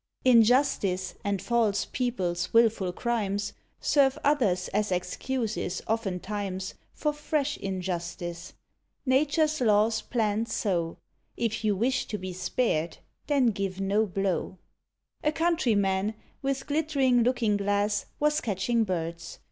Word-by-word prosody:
Injustice, 230 -6 +4
and 200 -1 0
false 225 -2 +1
people's 185 -8 -2
wilful 225 -5 +3
crimes, 205 -1 -1 0.3
Serve 275 -1 +3
others 225 -12 +2
as 210 0 0
excuses, 205 +3 -2
oftentimes, 195 -2 -3 0.2
For 300 -1 -1
fresh 295 -1 -1
injustice. 175 -2 -4 0.5
Nature's 300 +3 +2
law's 220 0 +3
planned 225 -1 -1
so; 175 -7 -1 0.4
If 225 -1 -1
you 210 -2 +2
wish 245 +7 0
to 210 - -3
be 185 -1 -6
spared, 175 -4 -1 0.3
then 270 -5 +3
give 195 -2 -3
no 200 +3 +1
blow. 190 -1 -2 0.7
A 300 - +3
Countryman, 220 - +1 0.3
with 275 0 -1
glittering 285 -5 +2
looking 230 -3 +2
glass, 205 +1 0
Was 300 +1 +2
catching 225 +3 +1
birds. 170 -3 -4
210 Hz, 115 wpm, -28 LUFS, 190-250 Hz, 0.7 s, Injustice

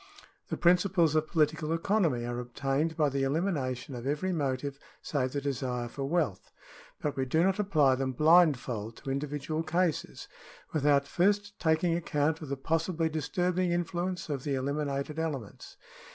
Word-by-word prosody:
The - - -3
principles 175 -2 +3
of 155 0 +1
political 155 0 +1
economy 165 - +1
are 120 0 -3
obtained 135 +6 -1
by 150 -3 +3
the 135 0 -1
elimination 135 -4 -1
of 120 +1 -5
every 165 +6 0
motive 140 -2 -2 0.2
save 130 -4 -1
the 140 - -1
desire 125 -3 -2
for 135 +3 -5
wealth; 150 - -1 0.5
but 150 - -1
we 135 - 0
do 160 +6 +2
not 190 +2 +2
apply 155 -10 +3
them 130 0 -1
blindfold 135 -8 +3
to 135 - -5
individual 145 +3 -2
cases, 170 0 -1 0.5
with 150 -2 +1
out 140 -1 +4
first 205 +4 +1
taking 160 +1 +2
account 160 -1 0
of 150 - -7
the 140 - -2
possibly 165 +3 0
disturbing 175 +3 0
influence 175 +1 -2
of 140 -4 -3
the 145 -2 -1
eliminated 140 +2 -2
elements. 140 -10 -5
150 Hz, 155 wpm, -30 LUFS, 135-170 Hz, 0.5 s, out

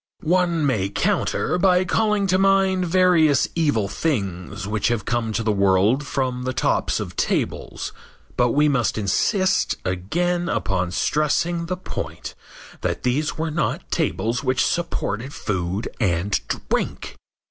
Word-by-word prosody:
One 170 -1 +2
may 105 -8 +1
counter 140 - 0
by 185 0 +4
calling 210 +1 +1
to 185 0 +2
mind 195 -1 +3
various 165 -5 +4
evil 145 -11 +1
things 95 - -3
which 105 0 0
have 115 -4 -1
come 115 -1 -1
to 115 +2 -1
the 110 - +1
world 100 +7 +2
from 130 -3 -1
the 130 +1 -2
tops - - 0
of - - -6
tables, - - -2 0.4
but 125 0 +3
we 145 +5 +3
must 135 -7 +1
insist 185 - +1
again 175 - -1
upon 90 -3 -1
stressing 165 - 0
the 185 +1 -2
point 185 - -6 0.5
that - - -2
these 140 +5 0
were 160 0 -2
not 155 0 -2
tables 110 +8 -1
which 130 0 +2
supported 130 -6 -2
food 95 0 -2
and 95 -2 +1
drink. - - -3
135 Hz, 135 wpm, -22 LUFS, 105-175 Hz, 0.5 s, by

